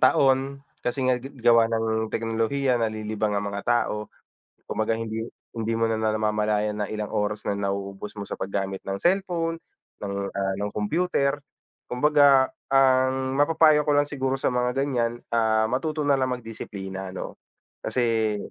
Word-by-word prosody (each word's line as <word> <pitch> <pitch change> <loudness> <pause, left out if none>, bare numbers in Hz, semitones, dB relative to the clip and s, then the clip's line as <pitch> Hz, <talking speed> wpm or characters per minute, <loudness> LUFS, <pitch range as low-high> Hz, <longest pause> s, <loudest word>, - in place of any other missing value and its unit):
taon. 135 +1 +3 0.2
Kasi 130 +2 -1
nga, 125 -1 +2
ga 135 - -8 0.2
gawa 115 -1 +5
ng 110 -1 0
teknolohiya 115 +3 0
nalilibang 110 -1 -1
ang 100 - -1
mga 100 0 -4
tao. 105 -3 0 0.6
Kumbaga 110 +1 0
hindi 115 0 -3 0.3
hindi 115 0 -1
mo 115 - +2
na 110 - 0
na 110 0 +1
namamalayan 105 -1 0
na - - -4
ilang 105 -1 -3
oras 105 0 -1
na 100 - 0
nauubos 100 0 -3
mo - - -4
sa - - -4
paggamit 95 0 -3
ng 95 0 -3
cellphone, 175 -3 +1 0.5
ng, 100 -1 -3 0.2
ah, 95 -1 -1
ng 105 - -2
kompyuter. 140 +4 0 0.5
Kumbaga 140 0 +5 0.2
ang 130 0 +3
mapapayo 155 0 +5
ko 150 - +3
lang 145 0 +3
siguro 135 -2 -1
sa 135 - 0
mga 125 0 0
ganiyan, 120 -3 -1
ah, 110 -1 +3
matuto 155 +4 -1
nalang 135 -3 +2
magdisiplina 95 -4 -7
'no? - - -6 0.4
Kasi, 115 -4 +1
115 Hz, 150 wpm, -25 LUFS, 105-135 Hz, 0.6 s, gawa